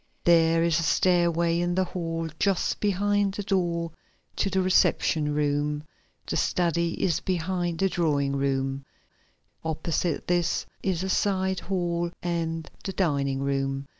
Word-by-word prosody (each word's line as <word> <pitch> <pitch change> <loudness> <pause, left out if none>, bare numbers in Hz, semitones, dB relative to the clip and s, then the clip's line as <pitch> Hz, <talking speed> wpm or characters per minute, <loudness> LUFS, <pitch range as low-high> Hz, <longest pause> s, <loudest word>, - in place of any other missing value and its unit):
There 165 -1 +4
is 170 -1 +2
a - - 0
stairway 170 0 +2
in 175 0 0
the 190 - +3
hall 165 -2 -3
just 195 -3 +1
behind 205 0 +1
the 205 - -3
door 170 -4 0 0.5
to 195 - +1
the 190 0 0
reception 165 -4 +2
room. 150 0 0 0.4
The - - -2
study 170 -1 0
is 170 -3 +2
behind 175 -1 -1
the 195 - +2
drawing 145 -6 +1
room. 135 0 -1 0.8
Opposite 160 +1 -1
this 175 -1 +1 0.2
is 185 -2 -1
a 190 - -2
side 190 -1 +1
hall 175 -2 -1
and 165 -2 -2 0.2
the 195 - -4
dining 140 -7 0
room. 135 0 -1
170 Hz, 135 wpm, -26 LUFS, 155-185 Hz, 0.8 s, There